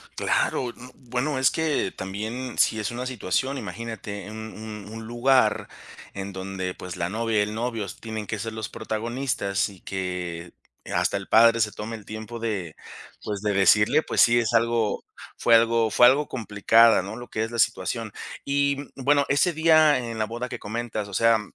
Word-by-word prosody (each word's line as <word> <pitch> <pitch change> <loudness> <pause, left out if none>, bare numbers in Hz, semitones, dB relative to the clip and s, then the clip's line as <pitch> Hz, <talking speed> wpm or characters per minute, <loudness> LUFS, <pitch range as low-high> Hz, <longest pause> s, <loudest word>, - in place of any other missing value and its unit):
Claro, 125 - 0
mm, 125 0 -15
bueno, 130 +3 -1
es 130 - +4
que 155 -11 0
también, 110 +6 -5
si 110 - +3
es 105 +2 -2
una 125 +2 -4
situación, 130 +3 -1
imagínate 110 -4 -6
un 110 0 -7
un 105 -2 -8
un 115 0 -7
lugar 130 +2 +2 0.5
en 100 0 -5
donde, 95 -1 -4
pues, 90 -1 -8
la 85 0 -2
novia 110 0 0
y - - +4
el 105 +1 -2
novio 115 -2 -2
s 95 - -8
tienen 110 -2 -5
que 110 0 -4
ser 110 +1 -4
los 110 -1 -5
protagonistas, 110 -3 -2
y 95 -3 -15
que 90 -2 -5 0.4
hasta - - +1
el - - -7
padre 115 +1 +6
se 105 -2 +1
tome 115 +2 -6
el 105 - -12
tiempo 110 +2 -7
de, 100 -8 -3 0.5
pues, 105 -2 -4
de 105 -1 0
decirle, 105 +9 +4
pues - - +1
sí, 120 0 +6
es 115 0 -1
algo 115 -2 +1 0.3
fue 115 -1 +5
algo 115 -1 +3
fue 120 - +6
algo 145 +3 +3
complicada, 115 -1 +4
¿no?, 100 +4 -7
lo 120 0 -8
que 110 - -2
es 115 - -4
la 115 - -4
situación, 115 -1 0 0.3
y, 140 0 +1 0.2
mm, 135 - -8
bueno, 140 +1 +4
ese 145 +6 +3
día 155 -3 +5
en 115 -2 -5
la 110 - +1
boda 120 +3 -5
que - - -6
comentas, 110 -1 -4
o - - -11
sea, 115 +2 +4
115 Hz, 190 wpm, -25 LUFS, 105-120 Hz, 0.5 s, padre